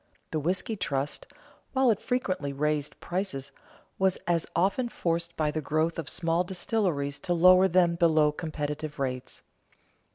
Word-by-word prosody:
The 155 - 0
whisky 180 +7 -1
trust, 140 -7 -3 0.5
while 265 -3 +4
it 210 - 0
frequently 190 - -1
raised 150 +1 -1
prices, 175 -7 -3 0.5
was 190 -1 +2
as 170 -1 +1
often 195 +8 +1
forced 170 -4 -2
by 150 -1 +1
the 155 - -2
growth 155 +3 0
of 155 - -4
small 165 0 0
distilleries 175 -6 -1
to 175 - -1
lower 185 +2 +7
them 175 -1 +3
below 155 -3 +4
competitive 150 -1 -4
rates. 130 -2 -4
165 Hz, 140 wpm, -28 LUFS, 150-185 Hz, 0.5 s, lower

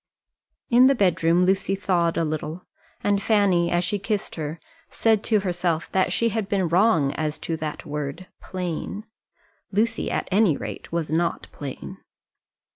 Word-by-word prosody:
In 250 +2 +7
the 275 - +4
bedroom 175 -3 +3
Lucy 195 +1 +1
thawed 175 -4 +1
a - - +2
little, 155 +3 -4 0.4
and 205 -1 +2
Fanny, 200 -5 +3
as 175 0 +1
she 205 +3 -1
kissed 205 0 -2
her, 155 0 -5 0.3
said 220 -2 +2
to 215 -3 +2
herself 175 -3 -1
that 190 -1 +2
she 230 - +2
had 220 -3 -2
been 195 -4 +1
wrong 165 -5 +3
as 155 -1 -2
to 165 - -3
that 155 0 -5
word 150 +3 -4 0.2
"plain." 185 +3 -4 0.7
Lucy, 215 +3 0
at - - -2
any 190 -6 +4
rate, - - -7
was 165 -3 -2
not 170 +2 0
plain. 145 +7 -7
180 Hz, 155 wpm, -24 LUFS, 165-200 Hz, 0.7 s, In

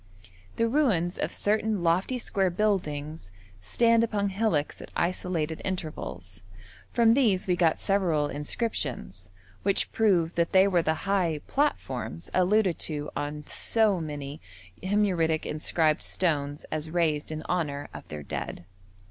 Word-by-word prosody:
The 230 - +2
ruins 220 - +1
of - - -1
certain 210 -2 0
lofty 180 +9 +1
square 195 -5 0
buildings 160 - -1 0.3
stand 230 - +3
upon 205 -3 0
hillocks 190 -7 0
at - - -10
isolated 170 -3 -1
intervals; 150 - -5 0.5
from 230 -1 +5
these 215 -9 +2
we 180 - +3
got 170 -2 +3
several 175 -7 +1
inscriptions, 140 - -3 0.3
which 195 0 +2
prove 185 -7 +2
that 170 0 0
they 190 +1 +6
were 180 -3 +3
the 160 +2 -1
high 180 -6 +1
'platforms' 130 - -2
alluded 185 0 +3
to 150 -2 -4
on 150 0 -4
so 215 -5 +3
many 145 -1 -6 0.4
Himyaritic 185 -5 +1
inscribed 155 0 +1
stones 145 -5 -1
as 155 0 -2
raised 160 -3 0
in 155 0 -5
honour 145 -5 -2
of - - -9
their 75 -1 -7
dead. 85 - -5
170 Hz, 130 wpm, -27 LUFS, 150-200 Hz, 0.5 s, they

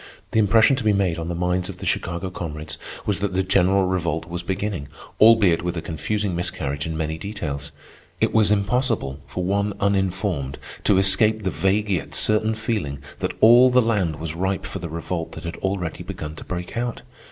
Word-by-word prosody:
The 110 - +2
impression 110 +5 +5
to 130 - -3
be 105 -1 +3
made 95 -4 +1
on 80 - -4
the 85 - -3
minds 90 +1 -1
of - - -7
the - - -7
Chicago 85 +2 -1
comrades 75 -3 -6 0.3
was 100 -3 0
that 100 -2 -2
the 95 - +2
general 95 0 +3
Revolt 85 -3 -1
was 85 +1 -4
beginning, 95 -4 -3 0.3
albeit 110 -6 +6
with 90 0 -3
a - - -2
confusing 95 +5 -2
miscarriage 70 -4 -2
in 80 -1 -3
many 80 0 -2
details. 75 -8 -4 0.5
It - - +1
was 110 -2 +4
impossible 105 - 0
for 90 +6 -4
one 100 +2 0
uninformed 95 -8 0 0.3
to 100 - +5
escape 105 +3 +3
the 95 - 0
vague 100 +2 +1
yet 85 -7 -2
certain 110 +1 +3
feeling 105 -10 -2 0.2
that - - -2
all 120 +3 +8
the 125 0 +4
land 105 -9 +1
was 80 0 -5
ripe 95 +3 -2
for 95 - -5
the 85 -1 -5
revolt 85 +1 -4
that - - -8
had 85 0 -5
already 95 -3 -3
begun 75 0 -6
to - - -8
break 90 -1 -5
out. 120 0 -3
95 Hz, 195 wpm, -23 LUFS, 85-105 Hz, 0.5 s, all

